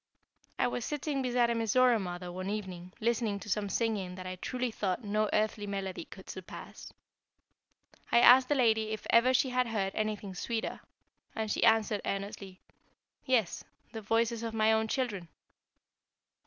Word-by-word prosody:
I - - +2
was 245 -1 -2
sitting 290 0 -2
beside 245 -2 +2
a - - +2
Mizora 235 +1 +3
mother 175 -1 -5
one 185 +2 -5
evening, 185 -4 -5
listening 225 -2 0
to 215 - -9
some 205 0 0
singing 200 -5 -1
that 185 0 -8
I 185 0 -4
truly 250 +5 -3
thought 200 +1 -2
no 215 +1 0
earthly 210 -1 0
melody 195 -3 -4
could 190 - -13
surpass. 185 -1 -9 1.2
I 235 - +6
asked 255 +1 +7
the 290 - +3
lady 220 -4 +2
if 215 - -6
ever 235 +2 +5
she 260 0 +2
had 250 0 +1
heard 200 -4 -1
anything 215 -2 -3
sweeter, 225 +5 -3 0.6
and 220 -1 -2
she - - 0
answered, 220 -2 +3
earnestly: 195 -1 -5 0.6
"Yes, 240 -9 +1 0.3
the 225 -2 -6
voices 230 +2 +1
of 225 -1 -4
my 220 0 +4
own 220 0 +1
children." 215 -8 -2
220 Hz, 160 wpm, -31 LUFS, 195-235 Hz, 1.2 s, asked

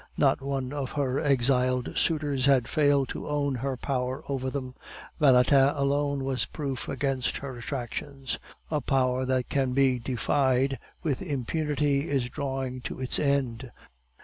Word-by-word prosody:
Not 135 -1 +3
one 135 -1 -3
of 140 -3 -4
her 140 -2 0
exiled 130 -3 +2
suitors 145 -4 +1
had 130 -4 +4
failed 145 -3 +3
to - - -5
own 145 -1 0
her 130 +1 -2
power 130 0 -2
over 130 -2 -2
them; 130 -2 -5 0.5
Valentin 135 -1 +6
alone 140 0 0
was 130 -3 0
proof 135 -5 -4
against 135 -3 -1
her 135 -2 -6
attractions. 135 +2 -4 0.3
A 150 -2 +1
power 130 -1 +1
that 130 -1 0
can 135 -2 +1
be 130 -2 +3
defied 130 +2 +1 0.2
with 145 -6 -1
impunity 145 +1 -1
is 135 -4 0
drawing 130 -2 -3
to - - -6
its 130 -1 +1
end. 135 -4 0
135 Hz, 145 wpm, -27 LUFS, 130-140 Hz, 0.5 s, Valentin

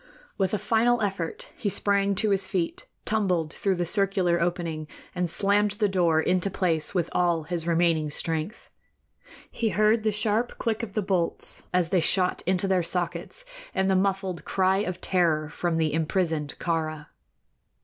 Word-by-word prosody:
With 190 -2 0
a - - 0
final 230 +4 +2
effort 425 - -3
he 205 - -2
sprang 200 0 +1
to 210 +2 +1
his 195 -1 +2
feet, 175 -3 -2 0.2
tumbled 180 -7 0
through 195 -2 0
the 175 0 -1
circular 185 -2 +1
opening, 170 -3 -2 0.3
and 180 -1 -1
slammed 205 +3 +2
the 210 0 +1
door 175 -5 +2
into 180 +4 +1
place 175 -3 -1
with 170 -2 +1
all 175 -2 +1
his 170 0 -3
remaining 165 -2 +2
strength. 160 +7 -2 0.8
He 225 - -1
heard 215 +3 +3
the 215 0 +1
sharp 215 +3 0
click 225 -1 -1
of 220 -4 -6
the 215 - -1
bolts 180 -3 +1
as 180 -2 +1
they 185 0 +3
shot 180 +2 +2
into 185 +1 +1
their 190 -2 +2
sockets, 180 - -3 0.3
and 190 0 +2
the - - +3
muffled 190 -2 0
cry 190 0 +2
of 185 -3 -3
terror 165 -5 +1
from 170 0 -2
the 155 -2 +1
imprisoned 160 -2 0
Kāra. 155 -3 -2
185 Hz, 165 wpm, -26 LUFS, 170-200 Hz, 0.8 s, heard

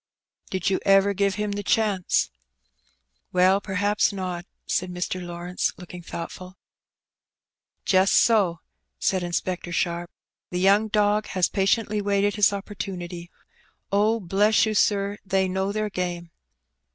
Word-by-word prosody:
Did 190 0 -1
you 190 - +1
ever 195 0 +4
give 200 0 +1
him 210 0 -2
the 205 0 -3
chance? 205 -3 +1 0.5
'* 65 0 -44
Well, 185 +2 +4
perhaps 205 +2 +1
not," 185 -3 -5 0.2
said 185 - -1
Mr. 180 +1 -3
LawrencOj 175 +1 -3
looking 180 0 -10
thoughtful. 180 +2 -8 1.3
"Just 190 +1 +4
so,'* 190 -8 +3 0.4
said 190 -1 0
Inspector 175 0 -3
Sharp. 170 0 -1 0.4
"The 180 - -3
young 200 +4 +4
dog 210 0 +1
has 185 -2 +1
patiently 205 +2 +1
waited 200 0 +1
his 210 -1 +4
opportunity. 185 -3 -6 0.6
Oh, 215 +3 +2
bless 205 +4 +3
you, 220 - -1
sir, 200 0 +1
they 190 0 +1
know 190 +1 -1
their 215 0 -2
game." 175 -2 -4
190 Hz, 130 wpm, -24 LUFS, 180-205 Hz, 1.3 s, ever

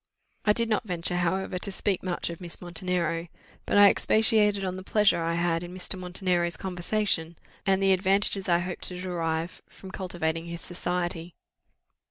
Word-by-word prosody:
I 210 - +5
did 230 +1 0
not 220 0 0
venture, 175 -1 0
however, 180 +1 -1
to 200 - -1
speak 195 -1 -1
much 175 -2 -3
of 170 - -9
Miss 175 -2 -6
Montenero; 175 -1 -2 0.4
but - - +2
I 205 0 +9
expatiated 210 -1 +3
on 185 -1 -2
the 185 - -6
pleasure 210 -3 +3
I 165 0 0
had 170 -1 +1
in 175 +1 -8
Mr. 185 - -1
Montenero's 180 -2 0
conversation, 180 -2 -1 0.3
and 195 - +5
on 190 - +1
the 195 0 +5
advantages 195 +1 +2
I 170 - +5
hoped 175 +1 -4
to 180 -1 -2
derive 170 -2 -3
from 190 - -12
cultivating 170 -4 -3
his 170 0 -6
society. 175 -1 -3
180 Hz, 175 wpm, -27 LUFS, 170-195 Hz, 0.4 s, I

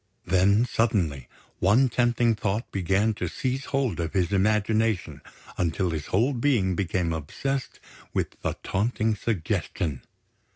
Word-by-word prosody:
Then, 100 +5 +4
suddenly, 100 - 0 0.3
one 115 +8 +4
tempting 120 -1 +2
thought 105 +2 -2
began 100 +4 +1
to - - -3
seize 130 +1 -2
hold 135 -8 -1
of 80 -1 -2
his 95 -1 +1
imagination 105 +1 +1 0.4
until 85 +1 0
his 80 -2 -4
whole 120 +9 +2
being 120 -7 +2
became 85 -2 0
obsessed 130 - -3 0.3
with - - -1
the - - -2
taunting 110 +2 0
suggestion. 85 - -2
105 Hz, 125 wpm, -26 LUFS, 90-120 Hz, 0.4 s, Then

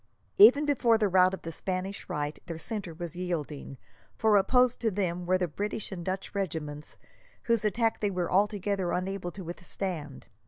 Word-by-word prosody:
Even 300 -8 +8
before 245 -6 +3
the 215 -2 +2
rout 185 -1 +5
of 190 - -7
the 165 - -5
Spanish 185 +3 -4
right, 150 0 -3
their 165 -2 -5
centre 195 -2 -4
was 170 -1 -6
yielding, 155 -6 -4 0.4
for 220 -2 +4
opposed 250 +5 +3
to 230 - +2
them 180 -3 -2
were 185 +1 +4
the 180 -1 0
British 205 +6 -3
and 180 -3 -5
Dutch 190 +2 -4
regiments, 150 -6 -4 0.5
whose 230 -2 +1
attack 225 +2 +1
they 205 - +1
were 180 -3 -2
altogether 200 -2 +1
unable 185 0 -2
to 190 +2 -9
withstand. 175 -3 -5
185 Hz, 170 wpm, -29 LUFS, 175-210 Hz, 0.5 s, Even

